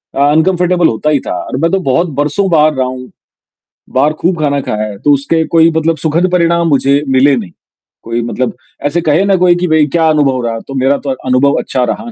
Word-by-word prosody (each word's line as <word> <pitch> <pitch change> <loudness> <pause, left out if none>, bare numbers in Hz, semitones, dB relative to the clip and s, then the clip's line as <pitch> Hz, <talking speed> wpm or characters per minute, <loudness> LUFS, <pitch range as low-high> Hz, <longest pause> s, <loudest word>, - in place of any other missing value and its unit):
अ, - - -3
uncomfortable 175 +1 +2
होता 115 +7 -1
ही 150 -2 +2
था - - -2
और 130 - -5
मैं 165 - +2
तो 195 - +1
बहुत 170 +7 +1
बरसों 170 +7 0
बाहर 155 -2 +3
रहा 130 -2 -1
हूँ, 130 0 -8 0.8
बाहर 140 +4 +1
खूब 175 -1 0
खाना 145 -1 0
खाया 105 -4 -3
है 100 - -10
तो 145 - +2
उसके 145 +4 0
कोई 165 0 +5
मतलब 160 0 0
सुखद 165 +4 0
परिणाम 170 -1 +1
मुझे 140 0 +2
मिले 135 +1 +3
नहीं, 100 -8 -5 0.5
कोई 115 +1 -3
मतलब 125 +2 -3 0.3
ऐसे 165 +4 -1
कहे 160 +3 +1
ना 195 -1 +2
कोई 175 -1 +4
कि 175 +1 -2
भाई 155 -1 +3
क्या 165 -1 +3
अनुभव 135 -5 +1
रहा? 115 -1 -3
तो 135 - -11
मेरा 135 +2 +1
तो - - -2
अनुभव 130 +2 +1
अच्छा 130 - -2
रहा। 235 +1 -9
150 Hz, 220 wpm, -12 LUFS, 130-170 Hz, 0.8 s, कोई